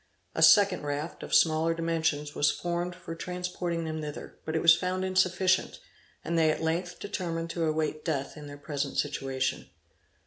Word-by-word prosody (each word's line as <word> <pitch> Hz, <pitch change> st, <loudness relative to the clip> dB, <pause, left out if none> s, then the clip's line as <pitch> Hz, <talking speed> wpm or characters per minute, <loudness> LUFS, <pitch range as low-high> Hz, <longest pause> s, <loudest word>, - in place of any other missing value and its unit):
A -, -, -2 dB
second 200 Hz, -3 st, +6 dB
raft, 145 Hz, +3 st, -4 dB
of -, -, -8 dB
smaller 160 Hz, +1 st, +4 dB
dimensions, 160 Hz, -3 st, -1 dB
was 145 Hz, -, +3 dB
formed 175 Hz, 0 st, -2 dB
for 175 Hz, -2 st, -8 dB
transporting 180 Hz, -1 st, -3 dB
them 160 Hz, 0 st, -3 dB
thither: 150 Hz, -1 st, -7 dB
but 160 Hz, -, -3 dB
it 160 Hz, -, +1 dB
was 165 Hz, -1 st, +8 dB
found 185 Hz, +2 st, -2 dB
insufficient, 185 Hz, 0 st, +2 dB, 0.5 s
and 170 Hz, 0 st, 0 dB
they 160 Hz, -1 st, +4 dB
at 155 Hz, -, -1 dB
length 175 Hz, +2 st, -2 dB
determined 170 Hz, -4 st, -3 dB
to 170 Hz, -1 st, -1 dB
await 155 Hz, -1 st, -1 dB
death 140 Hz, -5 st, -2 dB
in 150 Hz, -2 st, -9 dB
their 145 Hz, 0 st, -9 dB
present 145 Hz, -1 st, -4 dB
situation. 135 Hz, -2 st, -2 dB
165 Hz, 170 wpm, -29 LUFS, 155-180 Hz, 0.5 s, was